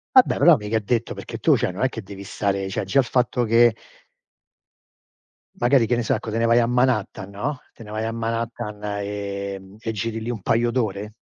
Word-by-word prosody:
Vabbè 255 Hz, -, +6 dB
però 170 Hz, -3 st, +7 dB
mica 105 Hz, 0 st, -2 dB
è -, -, +2 dB
detto 115 Hz, +2 st, -1 dB
perché -, -, -7 dB
tu -, -, +4 dB
cioè -, -, 0 dB
non 90 Hz, +5 st, -5 dB
è 130 Hz, -, +4 dB
che 115 Hz, -3 st, -7 dB
devi 100 Hz, 0 st, -9 dB
stare 100 Hz, 0 st, -1 dB
cioè 95 Hz, -, -2 dB
già 95 Hz, +9 st, +1 dB
il -, -, 0 dB
fatto 125 Hz, 0 st, +1 dB
che 115 Hz, +1 st, +5 dB, 1.8 s
magari 120 Hz, -1 st, +3 dB
che 120 Hz, -, +1 dB
ne 120 Hz, -, 0 dB
so, 130 Hz, -, +1 dB
ecco 110 Hz, -1 st, -4 dB
te 115 Hz, -, -1 dB
ne 115 Hz, -, +1 dB
vai 115 Hz, +1 st, +5 dB
a 115 Hz, -, +2 dB
Manhattan, 120 Hz, -5 st, 0 dB
no, 130 Hz, +8 st, -3 dB, 0.2 s
te -, -, -13 dB
ne 105 Hz, -, -11 dB
vai 110 Hz, +1 st, -3 dB
a 115 Hz, -, -2 dB
Manhattan, 115 Hz, -1 st, -3 dB
ehm, 100 Hz, -1 st, -4 dB
e 115 Hz, 0 st, -3 dB
giri 115 Hz, +2 st, -3 dB
lì 115 Hz, +2 st, -4 dB
un 115 Hz, -4 st, -4 dB
paio 115 Hz, +5 st, +2 dB
d'ore, 105 Hz, -4 st, -2 dB
115 Hz, 220 wpm, -23 LUFS, 100-120 Hz, 1.8 s, però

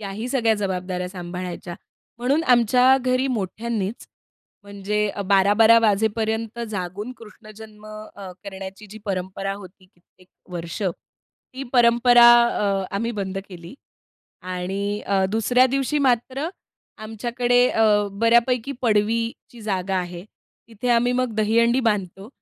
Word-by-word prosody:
याही 210 Hz, +4 st, -5 dB
सगळ्या 230 Hz, -4 st, +2 dB
जबाबदाऱ्या 185 Hz, -2 st, -3 dB
सांभाळायच्या 180 Hz, -1 st, -7 dB, 0.4 s
म्हणून 275 Hz, +7 st, +1 dB
आमच्या 250 Hz, +2 st, +4 dB
घरी 255 Hz, +1 st, 0 dB
मोठ्यांनीच 220 Hz, -1 st, -3 dB, 0.6 s
म्हणजे 200 Hz, +1 st, -2 dB, 0.2 s
12-12 205 Hz, +4 st, +5 dB
वाजेपर्यंत 220 Hz, +1 st, 0 dB
जागून 200 Hz, +4 st, -5 dB
कृष्णजन्म 215 Hz, -1 st, -14 dB
अ, 215 Hz, -3 st, -10 dB
करण्याची 195 Hz, +1 st, -9 dB
जी 220 Hz, -, -10 dB
परंपरा 195 Hz, 0 st, -3 dB
होती 190 Hz, -1 st, -13 dB
कित्येक 185 Hz, 0 st, -28 dB, 0.2 s
वर्ष, 170 Hz, +3 st, -6 dB
ती 225 Hz, +7 st, -8 dB
परंपरा 240 Hz, 0 st, +6 dB, 0.2 s
अ, 195 Hz, -4 st, -1 dB
आम्ही 230 Hz, +3 st, -2 dB
बंद 195 Hz, -2 st, -4 dB
केली. 175 Hz, +3 st, -11 dB, 0.7 s
आणि 195 Hz, +3 st, -3 dB
अ, 195 Hz, -1 st, +1 dB
दुसऱ्या 245 Hz, +4 st, +3 dB
दिवशी 275 Hz, +3 st, -1 dB
मात्र 265 Hz, +3 st, 0 dB, 0.5 s
आमच्याकडे 240 Hz, +3 st, 0 dB
अ, 225 Hz, -, +2 dB, 0.3 s
बऱ्यापैकी 235 Hz, +4 st, +2 dB
पडवीची 230 Hz, +2 st, -1 dB
जागा 190 Hz, -2 st, -2 dB
आहे 175 Hz, 0 st, -5 dB, 0.4 s
तिथे 230 Hz, +2 st, -5 dB
आम्ही 240 Hz, +1 st, +3 dB
मग 250 Hz, -3 st, -1 dB
दहीहंडी 230 Hz, +4 st, +2 dB
बांधतो 200 Hz, -3 st, -2 dB
215 Hz, 110 wpm, -22 LUFS, 195-235 Hz, 0.7 s, परंपरा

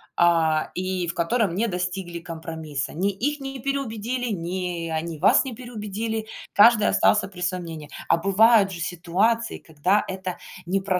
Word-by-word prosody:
а, 165 Hz, -2 st, +3 dB
и 185 Hz, -1 st, -2 dB
в 170 Hz, -, -3 dB
котором 175 Hz, +2 st, +1 dB
не 225 Hz, +5 st, +1 dB
достигли 180 Hz, -2 st, -3 dB
компромисса. 160 Hz, -3 st, -5 dB
Ни 190 Hz, +5 st, 0 dB
их 285 Hz, +10 st, -2 dB
не 270 Hz, -1 st, -6 dB
переубедили, 245 Hz, -2 st, -2 dB
ни 175 Hz, -2 st, -3 dB
они 160 Hz, 0 st, -3 dB
вас 175 Hz, +7 st, +5 dB
не 260 Hz, -4 st, -6 dB
переубедили. 220 Hz, -2 st, -4 dB, 0.3 s
Каждый 215 Hz, +1 st, +6 dB
остался 95 Hz, +1 st, +3 dB
при 185 Hz, -2 st, -11 dB
своём 180 Hz, 0 st, -1 dB
мнении. 160 Hz, -3 st, -8 dB, 0.2 s
А -, -, +4 dB
бывают 195 Hz, +3 st, +5 dB
же 175 Hz, -, -7 dB
ситуации, 185 Hz, +7 st, 0 dB
когда 180 Hz, +7 st, 0 dB
это 185 Hz, -1 st, -5 dB, 0.3 s
не 195 Hz, +2 st, +1 dB
про 190 Hz, -1 st, 0 dB
185 Hz, 160 wpm, -24 LUFS, 170-220 Hz, 0.3 s, Каждый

